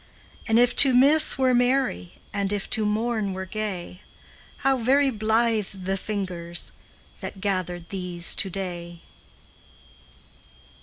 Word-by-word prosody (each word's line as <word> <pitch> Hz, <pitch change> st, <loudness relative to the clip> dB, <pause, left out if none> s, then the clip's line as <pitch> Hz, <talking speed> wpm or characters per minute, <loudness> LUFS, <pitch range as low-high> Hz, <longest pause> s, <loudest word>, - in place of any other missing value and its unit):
And 225 Hz, -1 st, +3 dB
if 245 Hz, 0 st, +4 dB
to 265 Hz, -2 st, +7 dB
miss 290 Hz, +5 st, +5 dB
were 260 Hz, -1 st, +3 dB
merry, 245 Hz, -, +1 dB, 0.2 s
And 200 Hz, -1 st, -1 dB
if 205 Hz, -1 st, -3 dB
to 215 Hz, -1 st, +2 dB
mourn 215 Hz, -2 st, -1 dB
were 190 Hz, 0 st, -5 dB
gay, 190 Hz, -3 st, -5 dB, 0.6 s
How 270 Hz, 0 st, +4 dB
very 270 Hz, +3 st, +3 dB
blithe 220 Hz, -1 st, +1 dB, 0.2 s
the 190 Hz, +1 st, -1 dB
fingers 185 Hz, -4 st, -4 dB, 0.5 s
That 195 Hz, -, -7 dB
gathered 180 Hz, -3 st, -3 dB
these 180 Hz, -3 st, -2 dB
to 195 Hz, -, -1 dB
day! 175 Hz, -2 st, -6 dB
205 Hz, 120 wpm, -24 LUFS, 185-240 Hz, 0.6 s, to